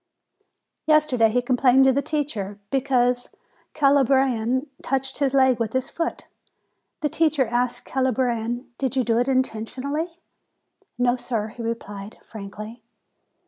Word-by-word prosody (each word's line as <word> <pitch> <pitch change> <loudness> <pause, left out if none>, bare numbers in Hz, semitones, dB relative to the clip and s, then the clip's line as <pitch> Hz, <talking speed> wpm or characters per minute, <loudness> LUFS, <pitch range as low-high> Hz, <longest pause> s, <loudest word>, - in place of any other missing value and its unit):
Yesterday 300 -7 +4
he 245 +3 +1
complained 255 +1 +4
to 265 0 +5
the 280 - +1
teacher, 230 -11 -3
because 250 -2 +2
the - - -26 0.4
Calabrian 265 -3 +3 0.2
touched 270 +1 -2
his 280 -2 +2
leg 260 -3 +4
with 225 -2 -2
his 260 0 -1
foot. 335 0 -3 0.8
The 300 - +2
teacher 310 -3 +2
asked 240 +1 -1
the - - -16
Calabrian: 250 -2 -1
"Did 265 -1 -1
you 260 - +2
do 230 -1 +1
it 245 - +1
intentionally?" 270 +6 -2 0.8
"No, 245 0 +2
sir," 225 -4 -3
he 235 +2 -10
replied, 210 -3 -5
frankly. 215 +2 -9
255 Hz, 135 wpm, -24 LUFS, 230-270 Hz, 0.8 s, to